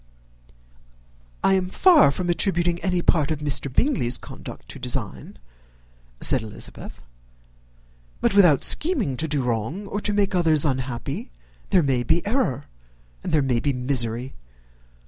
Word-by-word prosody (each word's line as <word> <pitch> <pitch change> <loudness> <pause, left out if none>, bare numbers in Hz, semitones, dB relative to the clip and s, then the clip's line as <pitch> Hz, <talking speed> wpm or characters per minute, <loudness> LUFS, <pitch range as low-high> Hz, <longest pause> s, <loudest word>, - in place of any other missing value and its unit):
"I 195 - +4
am 185 -1 0
far 340 - +5
from 175 +6 -3
attributing 175 0 0
any 180 -2 -1
part 155 -5 +2
of 155 - -1
Mr. 145 -2 -1
Bingley's 130 - 0
conduct - - -11
to - - -9
design," - - -5 0.8
said 130 - +2
Elizabeth; 110 -1 -8 1.2
"but, - - +1
without 175 -8 +5
scheming 270 - +3
to 160 - -1
do 145 -3 -1
wrong, 125 - -3
or 205 +1 -4
to 210 - -1
make 205 -2 0
others 160 -4 +3
unhappy, 135 - -3 0.4
there 185 -4 +3
may 130 -3 +1
be 165 +8 0
error 205 - -1 0.6
and - - -4
there 155 -3 +2
may 125 -3 0
be 140 +3 -1
misery. 125 -1 -1
155 Hz, 140 wpm, -23 LUFS, 130-190 Hz, 1.2 s, far